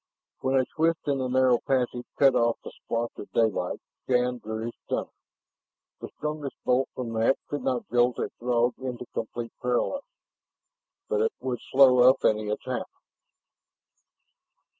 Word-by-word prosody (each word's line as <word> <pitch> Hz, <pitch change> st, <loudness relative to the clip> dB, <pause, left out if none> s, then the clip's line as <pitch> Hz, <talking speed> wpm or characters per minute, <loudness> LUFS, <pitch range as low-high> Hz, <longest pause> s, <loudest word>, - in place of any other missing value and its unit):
When 130 Hz, +1 st, 0 dB
a 130 Hz, -1 st, +4 dB
twist 165 Hz, +3 st, 0 dB
in 140 Hz, -2 st, 0 dB
the 130 Hz, -, -1 dB
narrow 130 Hz, -1 st, +4 dB
passage 125 Hz, -2 st, -1 dB
cut 135 Hz, -2 st, +6 dB
off 120 Hz, -2 st, +2 dB
the -, -, -8 dB
splotch 115 Hz, 0 st, -3 dB
of -, -, -8 dB
daylight, 110 Hz, -6 st, +1 dB, 0.3 s
Shann 125 Hz, -1 st, +1 dB
drew 110 Hz, 0 st, -5 dB
his 120 Hz, -, -4 dB
stunner. -, -, -2 dB, 0.9 s
The -, -, -7 dB
strongest 150 Hz, -2 st, -4 dB
bolt 125 Hz, +1 st, +2 dB
from 120 Hz, -3 st, -4 dB
that 115 Hz, +4 st, +3 dB
could 145 Hz, -1 st, -3 dB
not 125 Hz, -1 st, -1 dB
jolt 120 Hz, 0 st, +3 dB
a -, -, -2 dB
Throg 120 Hz, 0 st, +2 dB
into 125 Hz, -2 st, -5 dB
complete 115 Hz, +1 st, -4 dB
paralysis, 125 Hz, -, -1 dB, 1.0 s
but 455 Hz, -1 st, +1 dB
it 455 Hz, 0 st, +1 dB
would 125 Hz, -2 st, -3 dB
slow 130 Hz, -2 st, +7 dB
up 130 Hz, -, +2 dB
any 105 Hz, -1 st, +2 dB
attack. 105 Hz, -, -3 dB
125 Hz, 150 wpm, -27 LUFS, 120-135 Hz, 1.0 s, slow